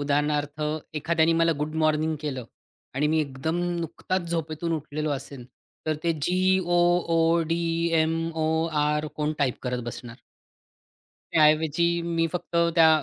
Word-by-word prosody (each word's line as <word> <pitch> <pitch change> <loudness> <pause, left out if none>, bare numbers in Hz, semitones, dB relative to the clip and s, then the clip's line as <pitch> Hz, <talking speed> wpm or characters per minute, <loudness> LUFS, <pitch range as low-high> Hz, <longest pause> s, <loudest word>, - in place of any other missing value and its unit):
उदाहरणार्थ, 145 +1 0 0.3
एखाद्याने 160 +2 +2
मला 165 0 +3
गुड 150 +1 -3
मॉर्निंग 155 +1 +1
केलं 135 -5 -4 0.5
आणि 145 +3 +1
मी 160 +1 +2
एकदम 145 +3 -2 0.2
नुकताच 170 +2 -3
झोपेतून 165 0 -2
उठलेलो 155 -1 -3
असेल, 140 -2 -5 0.4
तर 155 -1 0
ते 170 - +3
जी, 185 +3 +3
ओ, 175 0 +1 0.4
ओ, 165 +1 +3
डी, 165 +1 0 0.4
एम, 160 +1 +1 0.2
ओ, 160 0 +1 0.2
आर, 150 +1 0
कोण 150 0 0
टाइप 135 -4 0
करत 125 -1 -2
बसणार? 120 0 -8 1.1
त्या 160 - +4
ऐवजी 160 +3 +2
मी 165 -1 0
फक्त 175 -1 -4 0.2
त्या 165 -2 +7
155 Hz, 145 wpm, -26 LUFS, 150-165 Hz, 1.1 s, त्या